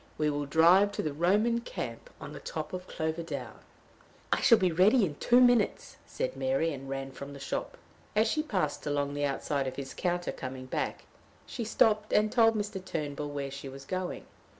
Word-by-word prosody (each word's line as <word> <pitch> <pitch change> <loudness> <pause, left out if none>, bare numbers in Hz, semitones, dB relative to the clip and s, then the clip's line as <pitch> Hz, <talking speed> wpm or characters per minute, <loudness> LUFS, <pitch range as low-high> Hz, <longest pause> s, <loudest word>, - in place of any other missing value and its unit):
We 150 -1 +1
will 145 0 -2
drive 175 +7 +5
to - - -2
the 150 - -2
Roman 205 +9 +2
camp 115 - -6
on - - -8
the - - -8
top 155 +1 -5
of 185 0 -5
Clover 160 +1 -2
down." 165 - -6 0.7
"I - - 0
shall 230 - +7
be 185 -4 +2
ready 195 +7 +5
in 155 - -4
two 245 +1 +4
minutes," 245 -4 +3
said - - -3
Mary, 260 - 0
and 135 0 -8
ran 135 0 -4
from 140 +1 -8
the 140 - -9
shop. 135 - -4 0.4
As 215 +2 +4
she 310 - +1
passed 155 - -2
along 145 -1 0
the 145 0 0
outside 140 0 -1
of 130 - -4
his 135 -1 -6
counter 175 -1 -1
coming 130 0 -7
back, 130 - -3 0.4
she 235 - -5
stopped 215 -1 +2
and 210 0 +3
told 225 -2 +5
Mr. 205 -3 -3
Turnbull 150 -5 -4
where 140 -1 -4
she 140 0 -7
was 135 +1 -10
going. 185 +1 -4
165 Hz, 195 wpm, -30 LUFS, 140-210 Hz, 0.7 s, shall